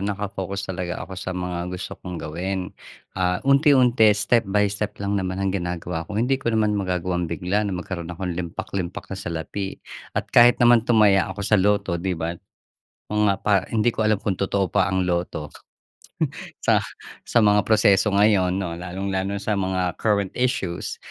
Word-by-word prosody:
nakafocus 100 Hz, -1 st, -3 dB
talaga 90 Hz, -2 st, -4 dB
ako 95 Hz, -, -11 dB
sa 90 Hz, -1 st, -4 dB
mga 90 Hz, -1 st, -3 dB
gusto 90 Hz, 0 st, -6 dB
kong 90 Hz, -1 st, -6 dB
gawin. 90 Hz, +4 st, -4 dB, 0.4 s
Ah, 90 Hz, 0 st, -1 dB
unti-unti 135 Hz, -5 st, +5 dB
step 110 Hz, 0 st, +2 dB
by 105 Hz, +1 st, +3 dB
step 105 Hz, 0 st, -3 dB
lang 100 Hz, 0 st, 0 dB
naman 95 Hz, 0 st, -3 dB
ang 95 Hz, -1 st, -1 dB
ginagawa 90 Hz, -3 st, -4 dB
ko. 105 Hz, -, -5 dB
Hindi 130 Hz, +4 st, +1 dB
ko 115 Hz, -, -2 dB
naman 105 Hz, -1 st, +2 dB
magagawang 90 Hz, -3 st, -1 dB
bigla 90 Hz, +5 st, -1 dB
na 95 Hz, -, -3 dB
magkaroon 90 Hz, -1 st, -5 dB
akong 90 Hz, +1 st, -4 dB
limpak 85 Hz, -1 st, -5 dB
limpak 90 Hz, 0 st, -4 dB
na -, -, -4 dB
salapi. 85 Hz, +4 st, -4 dB, 0.4 s
At -, -, -3 dB
kahit 120 Hz, 0 st, +7 dB
naman 120 Hz, -1 st, +5 dB
tumaya 105 Hz, -4 st, +4 dB
ako 95 Hz, +2 st, -6 dB
sa 105 Hz, -, +4 dB
lotto, 95 Hz, -3 st, +1 dB
'di 90 Hz, 0 st, -2 dB
ba? 80 Hz, +1 st, -2 dB, 0.8 s
Mga 105 Hz, -1 st, +2 dB
pa 100 Hz, -3 st, +2 dB
hindi 110 Hz, +1 st, +2 dB
ko 110 Hz, -2 st, 0 dB
alam 110 Hz, -2 st, +2 dB
kung 100 Hz, -4 st, -1 dB
totoo 100 Hz, -1 st, 0 dB
pa 100 Hz, 0 st, +2 dB
ang 95 Hz, -1 st, 0 dB
lotto 85 Hz, -4 st, -2 dB, 1.1 s
sa -, -, +2 dB, 0.4 s
sa -, -, -1 dB
mga 105 Hz, -2 st, +5 dB
proseso 105 Hz, -1 st, +3 dB
ngayon 95 Hz, -3 st, +3 dB
'no 90 Hz, -4 st, -3 dB
lalong-lalo 95 Hz, +3 st, -3 dB
sa 100 Hz, +2 st, -2 dB
mga 95 Hz, -2 st, -1 dB
current 100 Hz, -3 st, +1 dB
issues. 95 Hz, -9 st, -2 dB
95 Hz, 170 wpm, -23 LUFS, 90-105 Hz, 1.1 s, kahit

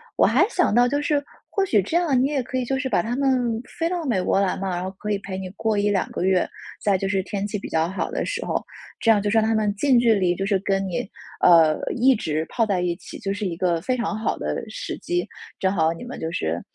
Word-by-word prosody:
我 -, -, +4 dB
还 290 Hz, -, +4 dB
想 360 Hz, -, +1 dB
到 245 Hz, +1 st, +5 dB
就 285 Hz, +3 st, 0 dB
是 290 Hz, -1 st, 0 dB, 0.3 s
或 395 Hz, -, +1 dB
许 245 Hz, -, +3 dB
这 265 Hz, -, -4 dB
样， 315 Hz, -8 st, +3 dB
你 260 Hz, -, +3 dB
也 285 Hz, -2 st, 0 dB
可 260 Hz, +1 st, -4 dB
以 255 Hz, -, -1 dB
就 265 Hz, +2 st, -1 dB
是 265 Hz, -1 st, -2 dB
把 -, -, +2 dB
他 235 Hz, +2 st, -2 dB
们 250 Hz, -4 st, +1 dB, 0.2 s
飞 330 Hz, -, +1 dB
到 350 Hz, -1 st, -2 dB
美 235 Hz, -10 st, 0 dB
国 195 Hz, -, +2 dB
来 195 Hz, -2 st, +1 dB
嘛， 190 Hz, -1 st, -3 dB
然 175 Hz, -, -3 dB
后 185 Hz, -, -3 dB
可 210 Hz, -, -4 dB
以 200 Hz, -, 0 dB
陪 190 Hz, -1 st, -6 dB
你 190 Hz, -1 st, -5 dB
过 215 Hz, +2 st, -1 dB
1-2 205 Hz, -2 st, +1 dB
个 -, -, -3 dB
月。 185 Hz, -1 st, +2 dB, 0.3 s
再 200 Hz, -2 st, +2 dB
就 195 Hz, -, -2 dB
是 190 Hz, 0 st, +1 dB
天 200 Hz, 0 st, -3 dB
气 210 Hz, -1 st, -3 dB
比 -, -, -7 dB
较 160 Hz, +1 st, +1 dB
好 190 Hz, -, -3 dB
的 -, -, -2 dB
时 -, -, -3 dB
候， -, -, -1 dB, 0.4 s
这 225 Hz, -, +4 dB
样 205 Hz, -2 st, +4 dB
就 205 Hz, -, -1 dB
是 225 Hz, -, +2 dB
让 220 Hz, -, +4 dB
他 225 Hz, -, +2 dB
们 215 Hz, -2 st, +1 dB
近 250 Hz, +3 st, +4 dB
距 235 Hz, -2 st, +4 dB
离 180 Hz, -3 st, +1 dB
就 195 Hz, -, -3 dB
是 200 Hz, -1 st, +2 dB
跟 195 Hz, -1 st, +1 dB
你， 180 Hz, +1 st, -3 dB, 0.3 s
呃， 165 Hz, -3 st, +6 dB, 0.2 s
一 260 Hz, +2 st, +4 dB
直 155 Hz, -6 st, -2 dB
泡 230 Hz, -, +1 dB
在 195 Hz, -4 st, 0 dB
一 175 Hz, -1 st, 0 dB
起， -, -, -11 dB
就 195 Hz, -, -3 dB
是 205 Hz, 0 st, -4 dB
一 170 Hz, -3 st, -2 dB
个 175 Hz, -1 st, +1 dB
非 255 Hz, +6 st, 0 dB
常 235 Hz, -3 st, -2 dB
好 220 Hz, -, -1 dB
的 -, -, -3 dB
时 -, -, -5 dB
机。 350 Hz, 0 st, -2 dB, 0.3 s
正 190 Hz, 0 st, +1 dB
好 160 Hz, -3 st, +2 dB
你 165 Hz, -, -9 dB
们 245 Hz, -, -7 dB
就 160 Hz, +1 st, -3 dB
是， 80 Hz, -, -2 dB
210 Hz, 295 characters per minute, -23 LUFS, 190-255 Hz, 0.4 s, 呃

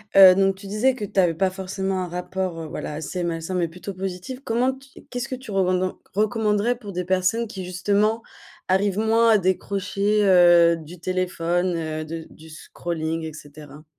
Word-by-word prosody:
Heu, 190 Hz, -1 st, +10 dB
donc 195 Hz, 0 st, +2 dB
tu 195 Hz, +1 st, -13 dB
disais 225 Hz, +6 st, +1 dB
que 215 Hz, -, -4 dB
tu 195 Hz, -, -1 dB
avais 175 Hz, -3 st, +4 dB
pas 190 Hz, +3 st, +2 dB
forcément 190 Hz, 0 st, -3 dB
un -, -, -4 dB
rapport, 180 Hz, 0 st, -4 dB
heu, 160 Hz, -, -5 dB
voilà, 150 Hz, -, -5 dB
assez 160 Hz, +4 st, -4 dB
malsain 165 Hz, +1 st, -3 dB
mais 175 Hz, -2 st, +1 dB
plutôt 180 Hz, +4 st, -8 dB
positif. 190 Hz, +6 st, -5 dB
Comment 245 Hz, +3 st, +1 dB
tu 270 Hz, 0 st, -16 dB
qu'est-ce 245 Hz, -1 st, -4 dB
que 260 Hz, -, -3 dB
tu 255 Hz, -3 st, -10 dB
revenden 185 Hz, -1 st, +1 dB, 0.2 s
recommanderais 215 Hz, +1 st, +1 dB
pour 210 Hz, -5 st, -9 dB
des 180 Hz, -1 st, -3 dB
personnes 185 Hz, +6 st, +1 dB
qui, 195 Hz, -4 st, -7 dB
justement, 205 Hz, +5 st, 0 dB, 0.4 s
arrivent 190 Hz, +1 st, +1 dB
moins 225 Hz, +1 st, +3 dB
à 220 Hz, -, +6 dB
décrocher, 200 Hz, +2 st, 0 dB
heu, 175 Hz, -3 st, +6 dB
du 165 Hz, +2 st, -11 dB
téléphone, 180 Hz, 0 st, -1 dB
heu, 155 Hz, -1 st, -4 dB
de 165 Hz, +1 st, -6 dB
du 160 Hz, +1 st, -15 dB
scrolling, 160 Hz, 0 st, -4 dB
et 160 Hz, -1 st, -6 dB
cetera? 150 Hz, 0 st, -12 dB
185 Hz, 185 wpm, -23 LUFS, 170-205 Hz, 0.4 s, Heu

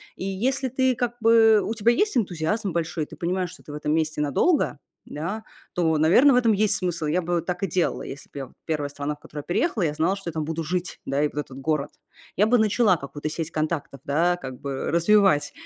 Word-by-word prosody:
и -, -, -7 dB
если 250 Hz, +8 st, -1 dB
ты 260 Hz, 0 st, +1 dB
как 240 Hz, -1 st, -2 dB
бы 225 Hz, -1 st, +6 dB
у 220 Hz, -, -2 dB
тебя 225 Hz, +1 st, +3 dB
есть 415 Hz, -, +1 dB
энтузиазм 195 Hz, -1 st, 0 dB
большой, 165 Hz, -1 st, -2 dB
и -, -, -7 dB
ты -, -, -12 dB
понимаешь, 180 Hz, +1 st, -1 dB
что 180 Hz, -, -14 dB
ты 145 Hz, -, -10 dB
в -, -, -5 dB
этом 150 Hz, 0 st, -1 dB
месте 155 Hz, -1 st, 0 dB
надолго, 150 Hz, -, +1 dB, 0.3 s
да, 185 Hz, +9 st, -5 dB, 0.3 s
то, 160 Hz, -3 st, +1 dB
наверно, 180 Hz, -, +6 dB
в 250 Hz, -, +4 dB
этом 230 Hz, -3 st, +4 dB
есть 210 Hz, 0 st, +2 dB
смысл. 175 Hz, -4 st, -2 dB
Я 170 Hz, +5 st, +1 dB
бы 175 Hz, 0 st, -1 dB
так 180 Hz, +2 st, -4 dB
и -, -, +2 dB
делала, 175 Hz, 0 st, 0 dB
если 140 Hz, -, -9 dB
б -, -, -12 dB
я 135 Hz, -, -6 dB, 0.2 s
1 150 Hz, -3 st, -1 dB
страна, 145 Hz, +1 st, -4 dB
в -, -, -28 dB
которую 150 Hz, -, -9 dB
я 175 Hz, -, -4 dB
переехала, 225 Hz, -, +1 dB
я 150 Hz, -3 st, 0 dB
знала, 165 Hz, +5 st, +1 dB
что 195 Hz, -3 st, -6 dB
я -, -, -4 dB
там 155 Hz, -1 st, -3 dB
буду 160 Hz, +1 st, -3 dB
жить, 180 Hz, +3 st, -3 dB
да, 140 Hz, +1 st, 0 dB
и 150 Hz, -, +3 dB
вот -, -, -13 dB
этот 135 Hz, -2 st, -6 dB
город. 150 Hz, 0 st, -1 dB, 0.5 s
Я 210 Hz, -, +4 dB
бы 245 Hz, +2 st, +4 dB
начала 215 Hz, -2 st, +3 dB
какую-то 145 Hz, 0 st, -6 dB
сеть 160 Hz, +1 st, -4 dB
контактов, 155 Hz, -3 st, -3 dB
да, 170 Hz, +5 st, +2 dB
как 130 Hz, -6 st, -8 dB
бы 135 Hz, -1 st, -3 dB
развивать, 170 Hz, -2 st, +4 dB
170 Hz, 240 wpm, -24 LUFS, 150-215 Hz, 0.5 s, бы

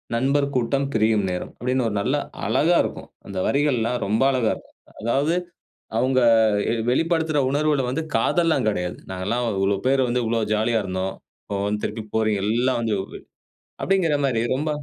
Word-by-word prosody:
நண்பர் 140 Hz, +4 st, +2 dB
கூட்டம் 135 Hz, +3 st, +1 dB
பிரியும் 110 Hz, -2 st, +2 dB
நேரம்" 90 Hz, 0 st, -4 dB
அப்படின்னு 125 Hz, +1 st, 0 dB
ஒரு 105 Hz, -, -3 dB
நல்லா 130 Hz, +7 st, +1 dB, 0.3 s
அழகா 170 Hz, +3 st, +3 dB
இருக்கும். -, -, -6 dB, 0.2 s
அந்த 100 Hz, -, -7 dB
வரிகள்லாம் 125 Hz, -4 st, +1 dB
ரொம்ப 110 Hz, +4 st, +1 dB
அழகா 125 Hz, -4 st, +1 dB
இருக்கும். -, -, -17 dB, 0.3 s
அதாவது 140 Hz, +9 st, +1 dB, 0.6 s
அவுங்க 130 Hz, +2 st, +2 dB, 0.5 s
எ -, -, +1 dB, 0.2 s
வெளிப்படுத்துற 160 Hz, +2 st, +1 dB
உணர்வுகள 145 Hz, -1 st, +1 dB
வந்து, 140 Hz, +6 st, -2 dB
காதல்லாம் 160 Hz, +2 st, +2 dB
கெடையாது. 90 Hz, -4 st, -2 dB
"நாங்கெல்லாம் 100 Hz, +7 st, -2 dB
இவ்வளளோ 95 Hz, +1 st, +1 dB
பேர் 135 Hz, 0 st, +3 dB
வந்து, 125 Hz, +1 st, 0 dB
இவ்வளோ 115 Hz, 0 st, 0 dB
ஜாலியா 110 Hz, +1 st, +1 dB
இருந்தோம். 95 Hz, 0 st, -3 dB, 0.3 s
இப்போ 100 Hz, -, -4 dB
வந்து 105 Hz, +1 st, -2 dB
திருப்பி 110 Hz, 0 st, -4 dB
போறீ 110 Hz, -1 st, +2 dB
எல்லாம் 120 Hz, +4 st, +1 dB
வந்து" 110 Hz, -2 st, 0 dB, 0.9 s
அப்படிங்கிற 180 Hz, -6 st, +2 dB
மாரி, 120 Hz, -4 st, +1 dB
ரொம்ப 150 Hz, +4 st, -2 dB
125 Hz, 155 wpm, -23 LUFS, 110-140 Hz, 0.9 s, அழகா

